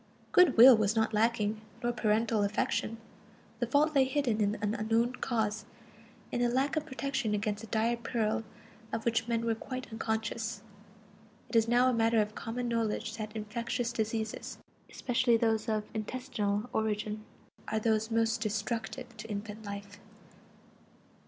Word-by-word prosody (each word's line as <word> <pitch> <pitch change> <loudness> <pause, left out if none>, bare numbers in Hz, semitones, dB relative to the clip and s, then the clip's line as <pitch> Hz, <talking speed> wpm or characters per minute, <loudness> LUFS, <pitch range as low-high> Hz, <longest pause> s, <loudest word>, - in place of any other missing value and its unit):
Good 360 -7 +6
will 250 +2 +11
was 215 0 +1
not 220 0 +1
lacking, 215 -1 +1 0.2
nor 240 - +2
parental 220 -1 +1
affection; 210 +2 -1 0.6
the 240 - 0
fault 295 +5 +3
lay 275 -2 +5
hidden 260 -5 0
in 205 0 +2
an 210 -1 -1
unknown 230 +3 +1
cause, 220 -3 -1 0.7
in 240 - -1
a 240 - +3
lack 270 +5 +1
of 310 0 -1
protection 260 -6 -1
against 210 +1 -2
a - - -7
dire 230 +2 +1
peril 230 -2 -1 0.5
of 225 - -3
which 230 0 +1
men 230 -1 0
were 230 - +2
quite 255 +2 -6
unconscious. 220 -1 -3 0.9
It - - -6
is 225 0 +5
now 245 +2 +4
a 255 - +3
matter 230 0 +3
of 210 0 0
common 240 +3 -4
knowledge 225 -1 -1
that 215 -1 -6
infectious 230 +3 -2
diseases, 220 -1 -3 0.3
especially 240 -1 +2
those 225 -1 +1
of 215 -1 0
intestinal 220 -2 -2
origin, 215 0 -1 0.4
are 220 - -1
those 220 0 +1
most 225 0 +1
destructive 225 +2 -3
to 220 +2 -8
infant 210 +1 -5
life. 200 0 -7
225 Hz, 150 wpm, -31 LUFS, 215-235 Hz, 0.9 s, will